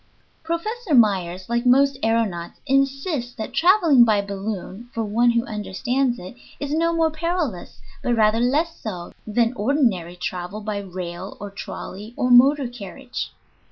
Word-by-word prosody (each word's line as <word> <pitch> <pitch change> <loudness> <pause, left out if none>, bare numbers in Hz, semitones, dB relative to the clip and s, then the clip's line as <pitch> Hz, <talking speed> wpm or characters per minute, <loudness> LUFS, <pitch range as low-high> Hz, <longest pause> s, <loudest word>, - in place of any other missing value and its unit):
"] - - -39
Professor 415 - -1
Myers, 185 -5 +2
like 235 0 0
most 270 +2 +4
aëronauts, 220 -7 0
insists 275 -1 0
that 220 -2 -6
traveling 340 - +5
by 215 -3 +3
balloon, 200 +2 -5
for 230 - 0
one 230 +3 +2
who 235 0 +2
understands 240 +5 -1
it, 180 +6 -9 0.2
is 285 0 -3
no 335 +2 +2
more 325 -1 +2
perilous, 315 - -3 0.2
but 240 - +1
rather 220 0 +3
less 295 +8 +1
so, 180 -6 -6 0.2
than 230 +2 +2
ordinary 215 - +1
travel 180 +3 -5
by 210 -1 -3
rail 180 -1 -6
or 205 0 -7
trolley 205 +3 -8
or 250 - +1
motor 270 +2 +6
carriage. 245 +2 -7
235 Hz, 150 wpm, -23 LUFS, 200-275 Hz, 0.2 s, motor